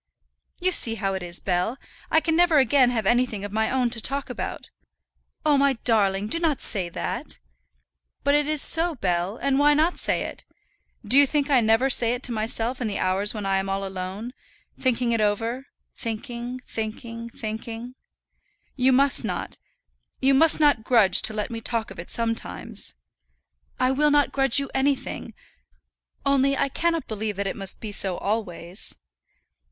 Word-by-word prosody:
"You 370 +1 +1
see 230 -10 +4
how 195 -3 -2
it 190 - -4
is, 175 0 -5
Bell; 185 +7 -1 0.3
I 320 - +3
can 320 0 0
never 345 -2 +4
again 265 -2 +4
have 225 -4 -1
anything 240 -3 +1
of 205 - -7
my 220 +1 0
own 250 -2 0
to 230 -1 -1
talk 275 +4 -1
about." - - -6 0.7
"Oh, 295 -2 +4
my 280 0 +3
darling, 205 -3 +1
do 335 - 0
not 315 -6 0
say 185 -4 +2
that." - - -5 0.9
"But 285 - +2
it 295 0 +2
is 305 -2 +2
so, 330 0 +3
Bell; 180 -1 -1
and 275 0 0
why 295 +1 +5
not 320 +4 +1
say - - 0
it? - - -7 0.6
Do 270 - +6
you 285 - +6
think 290 0 -1
I 260 -3 +5
never 225 +4 +3
say 245 -2 +4
it 250 - -9
to 250 - 0
myself 230 +3 -2
in 240 - -1
the 205 - -3
hours 195 +4 0
when 210 -2 -4
I 195 0 +1
am 195 0 -4
all 195 0 -2
alone, 190 +5 -6 0.5
thinking 235 -3 +1
over 225 +3 0
it 270 - -17 0.3
thinking, 235 +2 -5
thinking, 230 +1 -6
thinking. 225 +2 -6 0.8
You 260 0 +3
must 275 +2 +4
not, - - -5 0.6
you 270 +1 +3
must 320 +4 +4
not 290 -7 +3
grudge 210 -6 +5
to 220 - +5
let 210 +3 -3
me 230 -1 -5
talk 225 -3 -2
of 190 - -10
it 170 - -8
sometimes." 230 -1 -3 0.8
"I 255 - +2
will 295 +3 +2
not 290 -1 +3
grudge 270 -2 +2
you 280 -1 -1
anything; 270 +1 -2 0.9
only 275 0 +2
I - - +1
cannot 330 +3 -1
believe 215 -1 -3
that 200 +1 -3
it 195 - -3
must 195 -1 -3
be 215 - -6
so 190 -3 +1
always." 190 -4 -4
235 Hz, 180 wpm, -24 LUFS, 210-275 Hz, 0.9 s, Do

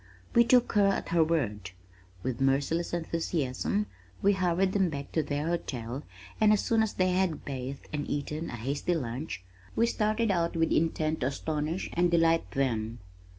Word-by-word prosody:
We 235 - +7
took 245 0 +4
her 205 -2 +5
at 195 - 0
her 170 -1 +4
word. 110 - -1 0.5
With 130 0 -2
merciless 140 +5 +1
enthusiasm 165 +2 -1 0.3
we 200 0 +4
hurried 185 0 +1
them 195 -3 +3 0.2
to 160 - +2
their 145 0 -2
hotel 135 -7 -3 0.4
and 215 -1 +6
as 210 - +4
soon 225 -1 +3
as 220 -2 0
they 185 0 +2
had 180 -4 0
bathed 135 0 -5
and 145 -1 -2
eaten 150 +3 -3
a - - -5
hasty 140 +9 -1
lunch, 120 - -4 0.3
we 230 - +4
started 215 -1 +1
out 170 -2 0
with 165 0 +2
intent 160 -1 +1
to 130 - +1
astonish 155 +4 -2
and 175 +1 +3
delight 165 -1 +3
them. 115 -4 -1
165 Hz, 165 wpm, -29 LUFS, 135-185 Hz, 0.5 s, We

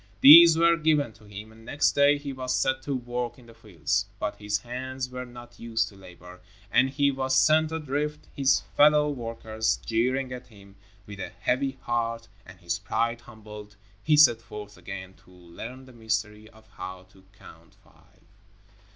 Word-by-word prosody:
These 165 +3 +10
were 170 0 +4
given 150 -6 +1
to 110 0 -20
him, 105 +2 -10
and 110 0 -17
next 145 +5 +1
day 145 +1 +4
he 145 -1 -7
was 130 -1 -3
set 130 0 0
to 140 0 -3
work 120 -1 -4
in 125 - -17
the 115 - -16
fields. 100 -1 -3
But 105 - -4
his 105 0 -2
hands 130 +3 -6
were 125 0 -7
not 120 0 -14
used 115 -2 -1
to 100 - -18
labor, 90 -1 -14 0.3
and 130 +2 +3
he 140 +1 +1
was 130 -1 -1
sent 155 +3 +3
adrift, 150 -1 -4
his 135 -1 +2
fellow 150 0 +5
workers 110 - -3
jeering 125 - -1
at 125 0 -9
him. 100 -4 -18 0.3
With 100 -1 -10
a - - -5
heavy 135 +1 -2
heart, 115 -1 -3 0.2
and 95 -1 -14
his 85 0 -3
pride 115 +4 -2
humbled, 105 -3 -12 0.3
he 155 -1 +3
set 120 -6 +6
forth 105 -2 -10
again 95 0 -9
to - - -23
learn 90 +9 -11
the 130 - -16
mystery 110 -2 -4
of 110 0 -20
how 95 0 -9
to 95 -1 -21
Count - - -17
Five. - - -26
120 Hz, 175 wpm, -26 LUFS, 105-135 Hz, 0.3 s, These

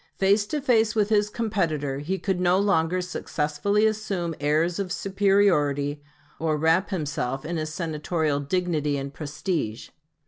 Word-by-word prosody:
Face 200 +2 +3
to 295 +5 -2
face 225 -5 +2
with 210 -1 +2
his 210 -1 +3
competitor, 165 - -1
he 175 +7 -2
could 190 -2 -1
no 180 0 +3
longer 185 -3 +2
successfully 180 +3 0
assume 205 -6 -1
airs 155 +5 +1
of 190 -2 -3
superiority, 180 -9 +2 0.4
or 155 -1 0
wrap 160 +5 +2
himself 145 -7 -3
in 170 +2 -3
his 155 0 -3
Senatorial 155 -2 -1
dignity 150 -2 0
and 140 0 -5
prestige. 145 - -3
170 Hz, 140 wpm, -25 LUFS, 150-200 Hz, 0.4 s, Face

